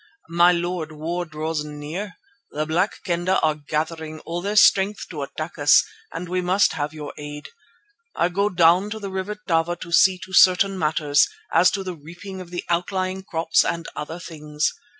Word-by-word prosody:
"My 170 +1 +5
Lord, 175 -2 -2
war 165 +3 -3
draws 155 0 -3
near. 150 +6 -6 0.3
The 150 +1 -3
Black 175 +6 -1
Kendah 175 +1 +1
are 155 -1 +3
gathering 155 +1 -4
all 170 +1 -4
their 200 +3 -2
strength 200 0 +4
to 155 -4 -5
attack 155 +4 -6
us 145 0 +6 0.3
and 170 +2 -6
we 180 +1 -1
must 185 +3 +2
have 145 0 -3
your 150 -2 -8
aid. 150 0 -8 0.7
I 170 - +2
go 200 +3 +1
down 180 +2 +4
to 220 +1 -5
the 200 -2 -6
River 190 +2 -3
Tava 175 -4 0
to 170 0 -10
see 185 +2 +5
to 190 - -14
certain 190 +1 +5
matters, 150 -2 +2 0.3
as 180 - +6
to 195 - -4
the 185 -1 -4
reaping 175 +5 -10
of 180 - -10
the 175 0 -5
outlying 185 +2 -1
crops 165 -3 +1
and 170 -1 -3
other 155 +3 -5
things. 150 -3 -3
170 Hz, 180 wpm, -23 LUFS, 155-185 Hz, 0.7 s, us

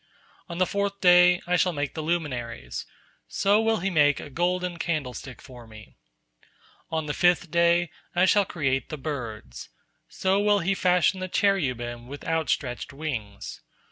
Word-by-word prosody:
On 170 - -6
the 185 - +3
fourth 200 +1 -2
day, 180 0 +6
I 180 +1 +1
shall 180 +1 +2
make 145 -2 -3
the 160 - -4
luminaries; 125 - -3 0.4
so 205 +2 +2
will 225 -3 +1
he 195 +1 -1
make 145 -4 +3
a 145 - -9
golden 180 +2 -1
candlestick 135 -7 -4
for 125 -4 -12
Me. 110 0 -14 0.9
On 160 -1 -2
the 145 - -3
fifth 175 -1 +2
day, 170 0 +3 0.2
I 180 +1 +4
shall 205 +2 +4
create 135 -7 -1
the 155 - -5
birds; 115 - -6 0.4
so 190 +1 0
will 205 0 +3
he 195 0 0
fashion 180 0 +2
the 185 - -3
cherubim 125 - 0
with 140 +2 -9
outstretched 155 -6 -1
wings. 125 -9 -6
165 Hz, 155 wpm, -26 LUFS, 130-180 Hz, 0.9 s, day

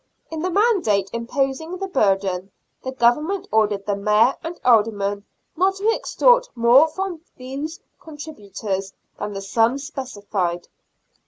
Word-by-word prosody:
In 320 - -4
the 365 - -1
mandate 345 - +2
imposing 270 +8 -2
the 390 - -3
burden 195 - 0 0.3
the 260 - -4
Government 300 +10 +1
ordered 210 -2 +1
the 205 - 0
Mayor 210 +5 +3
and 335 +1 -6
Aldermen 205 -4 +2 0.3
not 380 +3 +2
to 410 +3 +1
extort - - +3
more 240 +6 +6
from 360 0 -4 0.2
those 275 +6 -6 0.2
contributories 205 - -6 0.3
than 210 0 -4
the 195 0 -5
sums 235 +7 +1
specified. 205 - -3
250 Hz, 130 wpm, -22 LUFS, 205-320 Hz, 0.3 s, more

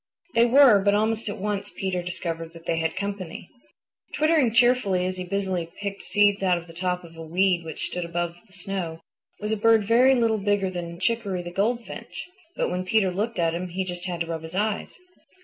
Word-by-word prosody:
They 235 +1 +5
were, 250 -4 +7
but 200 +1 +3
almost 220 +1 0
at 205 - -5
once 205 0 -3
Peter 190 -2 -2
discovered 165 -2 -5
that 165 0 -13
they 165 - 0
had 165 0 -1
company. 190 -4 -5 0.7
Twittering 305 -5 +3
cheerfully 230 -6 +3
as 185 0 -3
he 185 - -3
busily 185 -2 -2
picked 200 -1 -4
seeds 205 +1 +3
out 185 -2 +3
of 170 - -7
the 165 - -13
top 180 +1 -2
of 165 -1 -13
a 165 - -9
weed 175 +2 +1
which 160 - -5
stood 180 - -3
above 170 0 -2
the 190 - -21
snow, 175 -4 -4 0.4
was 210 +1 -3
a - - +2
bird 225 0 +4
very 250 +5 +5
little 225 -3 +2
bigger 200 -1 +1
than 170 -1 -6
Chicoree 195 -2 -1
the 175 - -7
Goldfinch. 230 +6 -3 0.3
But - - -1
when 180 +1 -1
Peter 190 0 +2
looked 210 +5 -2
at 165 -2 +1
him 175 +2 -3
he 180 +2 -3
just 175 0 -5
had 175 -2 -3
to - - +1
rub 165 -1 -4
his 160 +2 -9
eyes. 210 +1 -1
190 Hz, 210 wpm, -25 LUFS, 175-210 Hz, 0.7 s, were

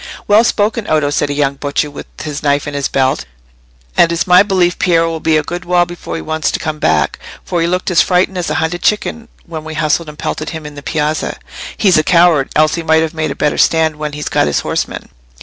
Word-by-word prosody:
"Well 210 +2 +5
spoken, 215 -1 0
Oddo," 150 -2 +1
said 145 0 0
a - - -1
young 140 -1 0
butcher, 145 +1 -2
with 145 - -9 0.2
his 150 -2 -5
knife 145 -1 +1
at 145 - -5
his 140 -1 -1
belt; 130 - 0 0.7
"and 170 - +4
it's 170 - 0
my 180 0 +6
belief 185 -3 +1
Piero 165 -4 +3
will 165 - -4
be 160 0 +2
a 155 - 0
good 175 +4 -5
while 175 0 +2
before 175 0 -7
he - - -5
wants 155 0 -1
to - - -2
come 155 -1 -4
back, 80 - +1 0.3
for 175 -2 -1
he 165 - +1
looked 180 +2 -1
as 175 - +5
frightened 185 0 +1
as 175 - -2
a - - -1
hunted 160 +2 -1
chicken, 225 +3 -1 0.2
when 160 -2 -7
we 160 0 -7
hustled 155 +1 0
and 150 - -11
pelted 155 0 -4
him 160 -2 -7
in 150 - -8
the 145 - -9
piazza. 155 +1 -2 0.4
He's 190 -6 +4
a - - +1
coward, 170 -5 +4
else 155 0 +3
he 170 - -2
might 160 0 +3
have 160 0 -3
made 155 -1 -2
a 140 - -4
better 150 - 0
stand 160 -2 +2
when 150 -1 -4
he'd 150 0 -5
got - - +2
his 75 - 0
horsemen. - - -3
160 Hz, 245 wpm, -15 LUFS, 150-175 Hz, 0.7 s, my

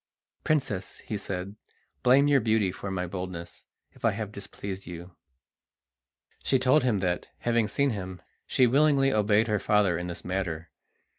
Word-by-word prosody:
"Princess," 135 -11 -1
he 110 - -5
said, 100 0 -4 0.5
"blame 135 - +5
your 145 -1 +5
beauty 110 -4 +2
for 100 - -6
my 95 -1 -2
boldness 90 -1 -6 0.3
if - - -21
I - - +5
have 105 0 -4
displeased 100 -1 -7
you." 90 +1 -9 1.3
She 135 - +2
told 130 +4 +4
him 110 -6 +1
that, 90 -2 -1
having 115 -2 +2
seen 140 +6 +1
him, 95 -3 -5 0.3
she 130 - +4
willingly 135 +1 +4
obeyed 105 +1 +3
her 105 -2 +1
father 100 -3 +2
in 90 - -4
this 85 0 -7
matter. 90 -3 -3
100 Hz, 155 wpm, -28 LUFS, 90-120 Hz, 1.3 s, blame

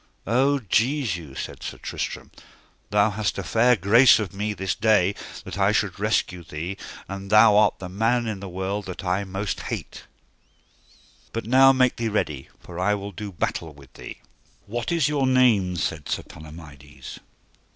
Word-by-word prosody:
O 135 +6 +2
Jesu, 105 - -1
said - - -6
Sir - - -6
Tristram, - - -5 0.6
thou 105 +1 +3
hast 105 +1 -2
a - - -3
fair 125 +2 +3
grace 110 +6 +6
of 105 -3 -4
me 105 +2 -2
this 95 -3 -2
day 105 -4 +3 0.3
that - - -7
I - - +4
should - - -1
rescue 90 -1 0
thee, 85 +5 -5 0.3
and 100 +1 -7
thou 110 0 +6
art 105 0 +4
the 95 - -7
man 115 +6 0
in 110 -3 -4
the 95 0 -7
world 95 +3 -4
that 95 0 -7
I 95 +2 0
most 95 0 -4
hate; - - -6 1.3
but 115 - -4
now 135 +3 +6
make 130 -2 +2
thee 115 -1 -1
ready, 75 -10 -2
for 90 0 -10
I 105 +3 +2
will 100 0 -6
do 100 +2 -7
battle 80 -3 -3
with 70 -2 -17
thee. - - -9 0.5
What 120 +5 -4
is 165 -5 +2
your 145 -3 +1
name? 115 -8 +3
said 75 -3 -3
Sir - - -2
Palomides. 75 -3 -12
100 Hz, 170 wpm, -24 LUFS, 90-115 Hz, 1.3 s, grace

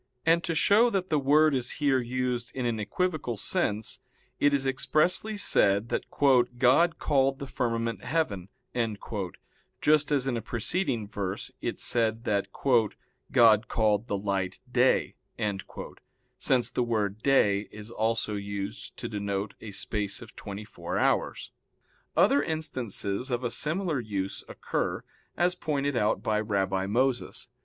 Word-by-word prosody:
And 165 +1 +4
to 165 - -1
show 215 +9 +5
that 190 -5 -2
the 150 - +3
word 150 +2 +4
is 125 -2 -1
here 140 -3 +2
used 125 -1 -2
in 130 -2 -2
an 115 -2 -1
equivocal 155 - -2
sense, 110 - -1 0.4
it 145 - +4
is 140 -1 0
expressly 155 +10 +1
said 100 - +3
that - - -1 0.5
"God 135 +7 +4
called 135 -2 +2
the 140 - -6
firmament 115 -5 -2
heaven"; 105 - -1 1.3
just 150 -1 +3
as 140 -3 +2
in 130 -3 0
a - - -3
preceding 120 - -1
verse 100 -2 -4
it - - -3
said 115 -1 +1
that 100 -4 0 0.8
"God 115 -2 +5
called 110 0 +1
the 100 - -1
light 95 -2 -2
day" - - +2 1.2
(since 125 -3 +1
the - - 0
word 110 -3 -1
"day" 105 -7 +3
is 105 +1 -10
also 110 -1 0
used 100 -1 -5
to - - -4
denote 100 -1 -3
a 110 - -7
space 100 0 -2
of 120 -1 -12
twenty 100 0 -7
four - - -5
hours). - - 0 0.7
Other 140 - +5
instances 130 - -3
of 125 0 -1
a 120 - -1
similar 160 -1 -1
use 100 -4 -4
occur, - - -3 0.3
as 175 +2 +3
pointed 145 -5 -1
out 105 -3 +1
by 105 -1 +1
Rabbi 95 -3 0
Moses. 125 +4 -1
120 Hz, 140 wpm, -28 LUFS, 105-145 Hz, 1.3 s, show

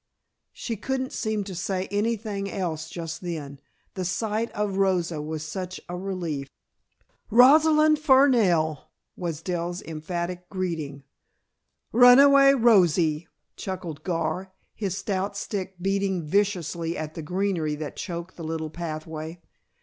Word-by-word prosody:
She 230 -3 -5
couldn't 260 +4 -3
seem 215 -2 -1
to 195 -1 -7
say 185 +1 -2
anything 205 -1 -1
else 160 -5 -3
just 165 -1 -6
then, 150 -6 -5 0.3
the 185 - -3
sight 215 +5 -1
of 205 -2 -2
Rosa 180 -5 +1
was 155 0 -4
such 185 +3 -5
a 175 - -5
relief. 175 -7 -4 0.8
"Rosalind 305 +6 +6
Fernell!" 235 - +4 0.3
was 165 -3 -4
Dell's 175 -1 -2
emphatic 175 +3 -5
greeting. 160 -8 -4 0.9
"Runaway 275 +3 +7
Rosie," 175 - +3 0.3
chuckled 175 -6 -6
Gar, 185 +1 -2 0.2
his 195 -3 -3
stout 195 0 -2
stick 195 -2 -4
beating 195 -1 0
viciously 170 -2 0
at 155 0 -5
the 165 - -6
greenery 180 -2 -1
that 150 -1 -6
choked 170 -1 -6
the 170 - -7
little 160 -1 -3
pathway. 160 0 -6
185 Hz, 120 wpm, -26 LUFS, 165-205 Hz, 0.9 s, Runaway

